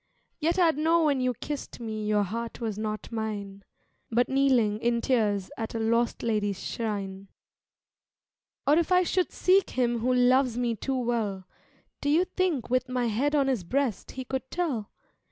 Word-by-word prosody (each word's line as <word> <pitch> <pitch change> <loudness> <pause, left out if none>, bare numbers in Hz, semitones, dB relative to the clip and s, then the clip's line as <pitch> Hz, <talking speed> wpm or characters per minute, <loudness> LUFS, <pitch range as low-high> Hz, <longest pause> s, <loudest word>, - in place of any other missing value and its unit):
Yet 330 +3 +1
I'd 330 -5 +3
know 330 +2 +3
when 285 -4 +2
you 250 -1 0
kissed 290 +3 -6
me 215 -2 -4
your 210 -1 +3
heart 230 +4 -5
was 225 -4 -2
not 215 +1 -4
mine 205 -3 -4 0.5
But 240 +2 +2
kneeling 255 -6 +3
in 235 0 +1
tears 210 -6 0
at 225 0 -4
a - - -1
lost 230 +1 +1
lady's 205 -4 0
shrine. 200 -3 -4 1.4
Or 295 +4 +5
if 340 +1 -1
I 365 0 +5
should 365 +1 0
seek 375 +1 +3
him 240 -2 0
who 250 +3 +1
loves 250 0 +3
me 240 -2 0
too 265 +5 -2
well, 220 -6 -2 0.5
Do 285 - 0
you 330 +5 +4
think 365 -8 -1
with 255 +1 0
my 250 -1 0
head 275 +8 +1
on 280 -2 +3
his 255 -8 0
breast 255 +4 -1
he 260 -1 -6
could 265 0 -4
tell? 285 - -2
240 Hz, 170 wpm, -27 LUFS, 215-275 Hz, 1.4 s, Or